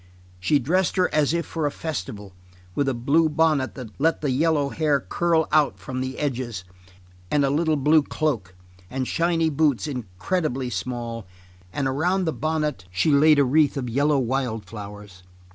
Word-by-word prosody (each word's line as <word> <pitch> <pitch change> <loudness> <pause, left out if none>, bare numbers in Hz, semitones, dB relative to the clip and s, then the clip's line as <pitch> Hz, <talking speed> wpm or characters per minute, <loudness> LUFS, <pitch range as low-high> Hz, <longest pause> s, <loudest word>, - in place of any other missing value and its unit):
She 90 +11 +3
dressed 170 +8 +1
her 185 -1 +1
as 150 -2 +3
if 170 0 -1
for 160 -3 -2
a - - -2
festival, 105 - -6 0.4
with 140 +7 +1
a 130 - -1
blue 150 +7 +2
bonnet 155 -3 +1
that 125 -5 -8
let 165 +1 +2
the 145 -3 0
yellow 145 +1 +2
hair 150 -2 +1
curl 165 +2 +1
out 150 -3 +3
from 130 -1 -5
the 130 0 -4
edges, 125 -9 -3 0.7
and 145 -1 +2
a 135 - +1
little 160 +2 +2
blue 150 +2 +4
cloak, 120 - -2 0.3
and 130 -1 -3
shiny 165 -1 +1
boots 145 -3 +1
incredibly 130 - -3
small, 120 -5 -4 0.4
and 135 +6 -1
around 175 +8 +1
the 160 - 0
bonnet 150 - -2
she 90 - +1
laid 150 +1 +6
a 140 - +4
wreath 145 +2 +3
of 130 -2 -3
yellow 145 +4 +2
wild 125 -4 -1
flowers. 105 -2 -10
140 Hz, 170 wpm, -24 LUFS, 125-155 Hz, 0.7 s, laid